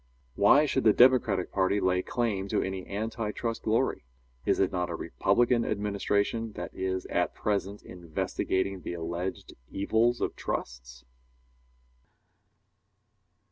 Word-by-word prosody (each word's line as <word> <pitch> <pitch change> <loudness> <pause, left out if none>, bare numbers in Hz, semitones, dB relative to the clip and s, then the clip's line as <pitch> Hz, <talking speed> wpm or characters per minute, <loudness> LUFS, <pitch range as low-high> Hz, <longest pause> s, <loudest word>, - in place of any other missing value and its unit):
Why 120 - +5
should 135 -2 0
the 110 - +6
Democratic 120 -7 +4
party 95 +1 +1
lay 90 -1 +2
claim 105 -3 -2
to - - 0
any 95 -1 -5
anti 110 +1 -3
trust 115 +1 -3
glory? 110 - 0 0.4
Is - - +2
it 95 - +2
not 90 -2 -1
a - - -3
Republican 120 0 +1
administration 105 +2 -1
that - - -6
is 95 0 -2
at - - -1
present 100 -1 -2
investigating 90 +2 -2
the - - -5
alleged 85 +2 -4 0.2
evils 110 +4 +1
of - - -2
trusts? 65 0 -5
100 Hz, 125 wpm, -28 LUFS, 95-115 Hz, 0.4 s, the